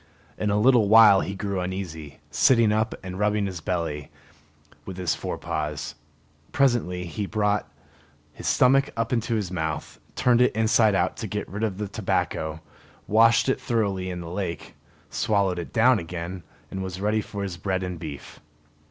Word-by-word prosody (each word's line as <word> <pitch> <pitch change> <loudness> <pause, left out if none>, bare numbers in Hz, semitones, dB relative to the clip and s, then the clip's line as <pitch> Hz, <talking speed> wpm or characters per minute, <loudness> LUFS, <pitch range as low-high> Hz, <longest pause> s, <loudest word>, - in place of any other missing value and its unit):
In 105 - -1
a 100 +1 +2
little 115 -3 +4
while 110 -3 +8
he 100 - -4
grew 100 -1 -3
uneasy, 90 -6 -5
sitting 115 -4 +4
up 110 +1 0
and 95 0 -6
rubbing 105 0 +1
his 90 -4 -5
belly 80 -4 -3 0.7
with 95 -2 -8
his 90 -4 0
fore - - -4
paws. 75 0 -4 0.6
Presently 120 -10 +1
he 90 +5 -4
brought 105 -1 0 0.6
his - - -7
stomach 135 +2 +4
up 115 +1 -1
into 115 -1 0
his 100 -5 -2
mouth, 80 -3 -4 0.2
turned 125 -1 +3
it 125 - +3
inside 110 -1 +3
out 90 - 0
to - - -4
get - - -4
rid 100 +5 -5
of 105 -4 -1
the 105 0 -3
tobacco, 80 -4 -2 0.4
washed 115 +3 +4
it 130 - 0
thoroughly 100 -6 -1
in 90 -1 -5
the 85 -1 -7
lake, 90 -2 -4 0.4
swallowed 100 -4 +1
it 85 - -6
down 120 +1 +4
again, 85 +2 -6 0.3
and 95 - -4
was 95 -1 -5
ready 105 +2 +1
for 100 -1 -6
his 95 -3 -4
bread 95 +1 -2
and 90 -2 -5
beef. 75 -4 -8
100 Hz, 170 wpm, -25 LUFS, 90-110 Hz, 0.7 s, while